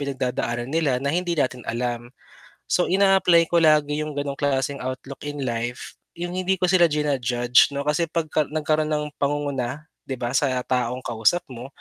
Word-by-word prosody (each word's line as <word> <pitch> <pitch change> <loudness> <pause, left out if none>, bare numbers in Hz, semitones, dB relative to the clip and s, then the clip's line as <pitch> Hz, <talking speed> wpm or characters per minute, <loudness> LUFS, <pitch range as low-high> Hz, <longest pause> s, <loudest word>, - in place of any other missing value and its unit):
pinagdadaanan 130 -2 -3
nila 155 -6 +1
na 140 - 0
hindi 175 0 -1
natin 130 -4 0
alam. 120 0 -3 0.6
So 180 - +2
ina-apply 190 -3 +4
ko 170 - +4
lagi 150 -2 +3
yung 155 -1 -4
ganong 140 -1 -3
klaseng 140 -1 0
outlook 130 +2 -6
in 145 -1 -4
life. 120 0 -4 0.2
Yung 175 +1 -4
hindi 185 +1 0
ko 185 - -7
sila 175 -2 +6
ji-na-judge 130 -4 +2
'no 140 - -2
kasi 150 +3 0
'pagka 155 -3 0
nagkaroon 155 0 0
ng 150 0 0
pangunguna, 140 -1 -2 0.2
'di 135 - -3
ba 120 -1 -2
sa 130 -3 +2
taong 125 -1 0
kausap 115 +10 +1
mo, 125 +1 -8
145 Hz, 170 wpm, -23 LUFS, 125-155 Hz, 0.6 s, sila